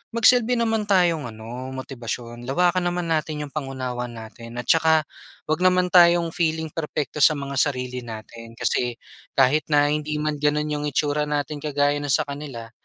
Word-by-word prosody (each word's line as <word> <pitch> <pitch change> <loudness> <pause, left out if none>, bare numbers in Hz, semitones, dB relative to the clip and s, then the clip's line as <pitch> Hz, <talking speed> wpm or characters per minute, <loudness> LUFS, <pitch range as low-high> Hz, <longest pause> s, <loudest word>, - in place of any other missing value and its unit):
magsilbi 245 +1 +4
naman 225 -3 0
tayong 175 -7 +2
ano 115 +4 -8
motibasyon. 120 -2 -6
Lawakan 175 +5 +2
naman 175 -1 -2
natin 155 -1 -1
'yong 145 - -8
pang-unawa 130 -4 -4
natin 115 0 -10
at 125 - -4
saka 160 -1 +4 0.4
huwag 155 +2 -1
naman 180 0 +3
tayong 170 -1 +6
feeling 160 -1 -1
perpekto 150 -2 -4
sa 155 +2 +6
mga 140 -1 -3
sarili 125 -3 0
natin. 115 0 -10
Kasi 120 +1 0 0.4
kahit 135 +3 +3
na 145 -1 +3
hindi 150 0 -2
man 150 0 -2
gano'n 150 +1 +1
'yong 150 0 -2
itsura 150 +1 0
natin 150 0 -2
kagaya 145 0 +1
no'ng 145 - -4
sa - - +1
kanila. 140 -5 -7
150 Hz, 165 wpm, -23 LUFS, 125-160 Hz, 0.4 s, tayong